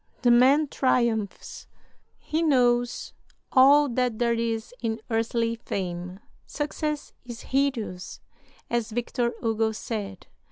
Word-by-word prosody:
The 245 - +5
man 270 +5 +5
triumphs; 235 -6 -1 0.5
he 315 +2 -2
knows 245 -5 +2 0.4
all 280 +3 +6
that 245 -2 0
there 235 0 +2
is 230 0 -2
in 225 -1 -2
earthly 230 +1 0
fame. 180 -4 -5 0.3
Success 300 0 -3
is 240 -2 -8
hideous, 255 -9 -2 0.5
as 235 -1 -1
Victor 240 +1 -1
Hugo 225 -1 +1
said. 210 -4 -5
235 Hz, 110 wpm, -26 LUFS, 225-260 Hz, 0.5 s, all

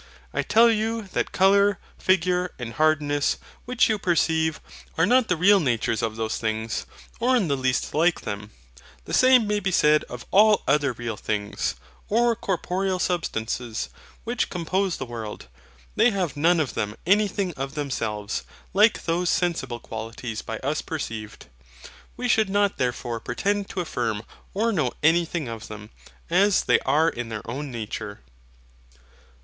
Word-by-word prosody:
I - - +1
tell 230 +1 +5
you 225 +1 -1
that - - -1
colour, 200 +1 +4 0.2
figure, 180 0 +1
and 120 -2 -6
hardness, 145 0 +2 0.3
which 250 0 +3
you 215 -2 0
perceive, 160 -2 +1 0.4
are 165 - +4
not 250 +2 +4
the 180 - +1
real 200 +4 +6
natures 115 - 0
of 110 -1 -2
those 110 0 -2
things, 110 0 -2 0.3
or 250 +2 +3
in 200 -10 +1
the 140 - +2
least 130 -1 -1
like 165 +3 +2
them. 100 0 -5 0.6
The - - -7
same 255 -3 +6
may 210 0 0
be 195 -1 -1
said 150 -4 +4
of 125 -1 -9
all 210 +1 +5
other 140 -1 +3
real 115 -2 -5
things, 105 -1 -2 0.3
or 235 +2 +3
corporeal 190 -2 -1
substances, 120 -10 -2 0.3
which 235 0 -1
compose 180 +1 -1
the 130 - -4
world. 115 -3 -7 0.5
They 245 - +5
have 185 - -2
none 165 +4 +3
of 145 -6 -1
them 105 0 -2
anything 200 -1 +2
of 135 0 -5
themselves, 110 -8 -3 0.3
like 210 +3 +4
those 170 +1 0
sensible 130 -9 -1
qualities 115 0 -6
by 110 - -5
us 145 +3 -1
perceived. 110 -9 -6 0.7
We 250 - -2
should 220 -4 +3
not 205 0 +1
therefore 120 -2 -2
pretend 200 - -2
to 185 - -3
affirm 115 -9 -2 0.3
or 225 +3 +1
know 175 -8 0
anything 165 -1 +2
of 115 -2 -7
them, 105 0 -10 0.4
as 195 +3 +3
they - - +4
are 150 +4 +4
in 120 -7 -3
their 110 -1 -6
own 140 +5 -4
nature. 110 -3 -6
160 Hz, 155 wpm, -24 LUFS, 120-195 Hz, 0.7 s, real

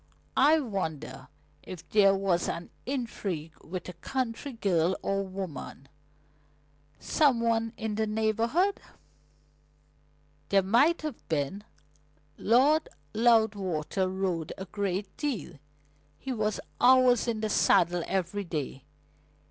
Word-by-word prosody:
"I 305 +4 +6
wonder 195 - -4 0.3
if 175 -2 -10
there 195 -2 +5
was 190 -3 0
an 170 +1 -5 0.2
intrigue 200 - -3
with 180 +1 -6
a 180 - -6
country 255 - -4
girl 185 -5 +1
or 195 0 0
woman, 185 -8 -7 1.1
some 285 -6 +2
one 230 -1 +1
in 220 -2 -3
the 220 +1 0
neighbourhood?" 230 - +1 1.7
"There 195 -1 +4
might 280 - +3
have 305 -2 -6
been. 160 +6 -1 0.7
Lord 280 +7 +3 0.2
Loudwater 205 -6 +2
rode 185 -4 -2
a 190 - -6
great 195 +1 -3
deal. 240 - -3 0.6
He 265 - -4
was 215 -2 -1 0.2
hours 250 -1 +5
in 225 -2 -1
the 215 - -1
saddle 175 -2 +3
every 195 +2 -1
day. 145 -6 -5
205 Hz, 110 wpm, -28 LUFS, 180-235 Hz, 1.7 s, I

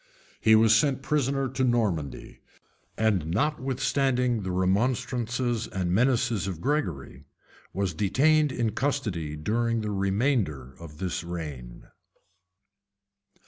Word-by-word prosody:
He 110 0 +5
was 110 0 +5
sent 135 +3 +1
prisoner 135 -2 0
to 130 +1 -2
Normandy; 105 - -1 0.6
and 100 -8 +1
notwithstanding 130 - 0
the 95 - -4
remonstrances 120 +5 0
and 90 -4 -2
menaces 120 -1 +1
of 90 -4 -4
Gregory, 85 - -3 0.5
was 95 -3 -2
detained 145 - +2
in 115 -4 -1
custody 105 - -2
during 115 +8 0
the 105 -1 -3
remainder 95 - 0
of 80 -3 -11
this 90 0 -3
reign. 75 -9 -7
110 Hz, 105 wpm, -27 LUFS, 90-130 Hz, 0.6 s, He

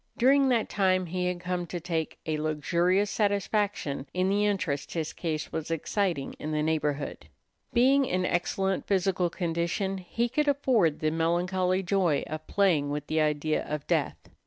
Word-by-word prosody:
During 270 +2 +4
that 235 -3 +2
time 185 -2 +2
he 180 +1 -2
had 180 -1 -2
come 180 -1 -2
to 175 - -4
take 165 -2 -3
a 155 -1 -1
luxurious 170 +6 +1
satisfaction 200 -8 0
in 185 +1 +2
the 205 +1 +2
interest 165 -9 -2
his 160 -2 -3
case 155 -3 -3
was 160 -1 -4
exciting 165 -2 -1
in 155 - -4
the 150 0 0
neighborhood. 150 -2 -2 0.4
Being 265 +3 +4
in 185 -5 0
excellent 190 +2 -1
physical 185 -2 +1
condition, 170 +3 -2
he 230 +6 -1
could 295 +5 0
afford 250 - +2
the 155 0 +1
melancholy 180 +3 +1
joy 175 -6 +1
of 155 0 -7
playing 170 -8 +2
with 145 0 -3
the 155 +1 0
idea 155 0 0
of 150 -1 -4
death. - - 0
180 Hz, 160 wpm, -28 LUFS, 155-200 Hz, 0.4 s, During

